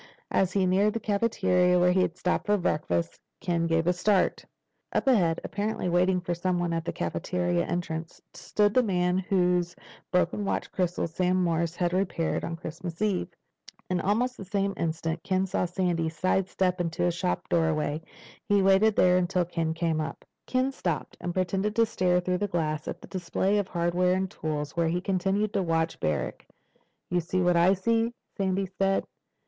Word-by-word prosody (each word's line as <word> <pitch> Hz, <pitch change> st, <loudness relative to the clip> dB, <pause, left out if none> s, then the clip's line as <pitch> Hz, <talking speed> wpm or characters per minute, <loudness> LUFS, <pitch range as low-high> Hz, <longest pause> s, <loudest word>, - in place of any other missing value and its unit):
As 190 Hz, -1 st, +2 dB
he 190 Hz, 0 st, +2 dB
neared 195 Hz, +3 st, +3 dB
the 230 Hz, -, -2 dB
cafeteria 200 Hz, -4 st, +2 dB
where 180 Hz, 0 st, +4 dB
he 185 Hz, +1 st, +3 dB
had 175 Hz, -1 st, -1 dB
stopped 180 Hz, +3 st, -1 dB
for 210 Hz, 0 st, +3 dB
breakfast, 150 Hz, -, -1 dB, 0.2 s
Ken 170 Hz, -1 st, 0 dB
gave 165 Hz, 0 st, +1 dB
a 180 Hz, -, +3 dB
start. 180 Hz, +1 st, +1 dB, 0.5 s
Up -, -, 0 dB
ahead, 180 Hz, -11 st, +3 dB
apparently 205 Hz, -2 st, -2 dB
waiting 180 Hz, +1 st, +3 dB
for 175 Hz, 0 st, -3 dB
someone 175 Hz, -1 st, -1 dB
at 165 Hz, 0 st, -2 dB
the -, -, -1 dB
cafeteria 175 Hz, -1 st, -1 dB
entrance, 165 Hz, -2 st, -4 dB
stood 205 Hz, -1 st, +1 dB
the 255 Hz, -, +5 dB
man 180 Hz, -4 st, +1 dB
whose 180 Hz, -2 st, +1 dB, 0.4 s
broken 180 Hz, +3 st, +1 dB
watch 195 Hz, -, -2 dB
crystal 180 Hz, -2 st, -1 dB
Sam 180 Hz, +2 st, +1 dB
Morris 170 Hz, -1 st, 0 dB
had 175 Hz, 0 st, 0 dB
repaired 180 Hz, -3 st, 0 dB
on 165 Hz, -, -3 dB
Christmas 165 Hz, +1 st, -7 dB
Eve. 205 Hz, -4 st, 0 dB, 0.6 s
In 180 Hz, -1 st, +1 dB
almost 245 Hz, +7 st, 0 dB
that 195 Hz, -, -9 dB
same 200 Hz, 0 st, 0 dB
instant 165 Hz, 0 st, -2 dB
Ken 190 Hz, 0 st, 0 dB
saw 185 Hz, -1 st, -1 dB
Sandy 175 Hz, -2 st, 0 dB
sidestep 185 Hz, +2 st, 0 dB
into 165 Hz, 0 st, -1 dB
a 175 Hz, -, +2 dB
shop 180 Hz, +1 st, -2 dB
doorway. 155 Hz, -2 st, +1 dB, 0.5 s
He 205 Hz, -1 st, +4 dB
waited 195 Hz, +3 st, +4 dB
there 180 Hz, 0 st, +5 dB
until 180 Hz, 0 st, +1 dB
Ken 165 Hz, -2 st, -2 dB
came 165 Hz, -1 st, 0 dB
up. 155 Hz, -, -6 dB, 0.2 s
Ken 255 Hz, +1 st, +1 dB
stopped 175 Hz, -, -3 dB
and 175 Hz, -, -2 dB
pretended 190 Hz, +3 st, -1 dB
to 230 Hz, -, +4 dB
stare 180 Hz, -4 st, +1 dB
through 180 Hz, 0 st, -1 dB
the 205 Hz, -, 0 dB
glass 155 Hz, -5 st, -2 dB
at -, -, -4 dB
a -, -, -18 dB
display 190 Hz, +2 st, 0 dB
of 200 Hz, -, -2 dB
hardware 175 Hz, +1 st, +1 dB
and 190 Hz, 0 st, -2 dB
tools, 150 Hz, -1 st, -4 dB
while 170 Hz, -1 st, +2 dB
he 170 Hz, +2 st, 0 dB
continued 195 Hz, +2 st, 0 dB
to 195 Hz, -, +1 dB
watch 165 Hz, -2 st, 0 dB
Barrack. 75 Hz, -2 st, -2 dB, 0.6 s
"You 175 Hz, -, +2 dB
see 185 Hz, +2 st, -1 dB
what 180 Hz, 0 st, +3 dB
I 175 Hz, +3 st, +5 dB
see?" 230 Hz, +4 st, 0 dB, 0.2 s
Sandy 195 Hz, 0 st, 0 dB
said. 195 Hz, 0 st, +2 dB
180 Hz, 180 wpm, -27 LUFS, 170-195 Hz, 0.6 s, the